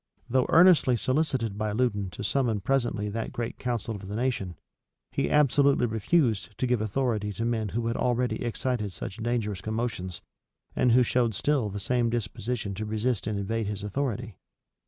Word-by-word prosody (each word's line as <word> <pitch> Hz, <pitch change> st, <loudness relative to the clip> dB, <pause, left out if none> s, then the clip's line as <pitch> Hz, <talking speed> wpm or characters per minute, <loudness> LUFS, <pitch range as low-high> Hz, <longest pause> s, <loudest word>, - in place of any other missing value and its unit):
Though 130 Hz, 0 st, +2 dB
earnestly 165 Hz, -7 st, +6 dB
solicited 130 Hz, -5 st, 0 dB
by 105 Hz, -1 st, -1 dB
Loudon 105 Hz, -5 st, 0 dB
to 90 Hz, -, -7 dB
summon 115 Hz, -2 st, 0 dB
presently 120 Hz, -3 st, 0 dB
that 115 Hz, +2 st, -3 dB
great 120 Hz, -1 st, -4 dB
council 120 Hz, -3 st, -2 dB
of 100 Hz, -2 st, -8 dB
the 100 Hz, -, -5 dB
nation, 115 Hz, -7 st, -1 dB, 0.6 s
he -, -, 0 dB
absolutely 140 Hz, -2 st, +4 dB
refused 110 Hz, -, +1 dB
to -, -, 0 dB
give 125 Hz, -3 st, +1 dB
authority 110 Hz, -1 st, 0 dB
to 115 Hz, -, -3 dB
men 110 Hz, -3 st, 0 dB
who 115 Hz, +4 st, -2 dB
had 115 Hz, +1 st, 0 dB
already 125 Hz, 0 st, 0 dB
excited 120 Hz, -4 st, -2 dB
such 95 Hz, +5 st, -6 dB
dangerous 110 Hz, -4 st, -2 dB
commotions, 110 Hz, -5 st, -3 dB, 0.5 s
and 125 Hz, -2 st, +3 dB
who 125 Hz, +1 st, +6 dB
showed 120 Hz, -2 st, +1 dB
still 135 Hz, -1 st, +1 dB
the 100 Hz, +1 st, -5 dB
same 120 Hz, +3 st, +1 dB
disposition 115 Hz, -1 st, -3 dB
to 105 Hz, +3 st, -4 dB
resist 110 Hz, +2 st, -1 dB
and 105 Hz, -2 st, -1 dB
invade 110 Hz, +2 st, -2 dB
his 100 Hz, -1 st, -4 dB
authority. 120 Hz, 0 st, -2 dB
115 Hz, 170 wpm, -27 LUFS, 105-125 Hz, 0.6 s, earnestly